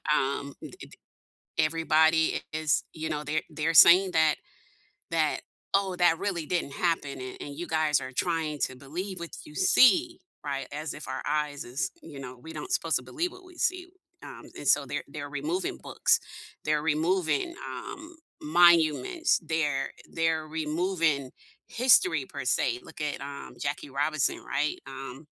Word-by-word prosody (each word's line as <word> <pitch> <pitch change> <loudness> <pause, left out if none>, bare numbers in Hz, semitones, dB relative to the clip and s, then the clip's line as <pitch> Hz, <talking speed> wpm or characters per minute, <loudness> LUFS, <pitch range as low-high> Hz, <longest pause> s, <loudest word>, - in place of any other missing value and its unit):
Um, 140 +1 -1
it - - -9
it - - -11 0.6
everybody 160 0 +3
is 155 -1 +1
you 160 0 -4
know, 150 0 -3
they're 155 +2 -1
they're 155 +2 -1
saying 180 +4 +8
that 160 -2 +4 0.8
that - - +1 0.3
"Oh, 195 -2 +2
that 175 -2 +4
really 175 -6 -2
didn't 170 -5 -2
happen, 145 -6 -1
and 130 0 -7
and 140 -1 -7
you 175 - -5
guys 155 -3 +2
are 130 - -6
trying 160 +1 -1
to 130 - -11
believe 175 +8 -6
what 170 - -7
you 150 - -13
see," 335 - +5 0.3
right, 135 -2 -3
as 150 0 -4
if - - -9
our 130 0 -4
eyes 150 -1 -1
is 130 +6 -3
you 145 -4 -10
know, 125 -1 -8
we 160 +7 -11
don't 375 - -6
supposed - - +1
to - - -8
believe 345 +1 -2
what 370 +1 -14
we 365 -1 -16
see, 365 +1 0 0.4
um, - - -10
and - - -5
so - - +4
they're - - -4
they're - - -7
removing 360 +4 -2
books, - - +2 0.5
they're 150 -1 +1
removing, 170 - +1 0.2
um, 330 +1 -8 0.2
monuments, 175 - +4
they're 150 -4 0 0.2
they're 165 -1 0
removing 160 -3 0 0.4
history 180 - +4
per 135 -3 -6
se, 120 -1 +1
look - - -11
at, 150 -1 -2
um, 140 0 -8
Jackie 140 0 -3
Robinson, 145 +1 0
right? 150 +1 0
Um 135 +2 -8
155 Hz, 160 wpm, -28 LUFS, 145-175 Hz, 0.8 s, saying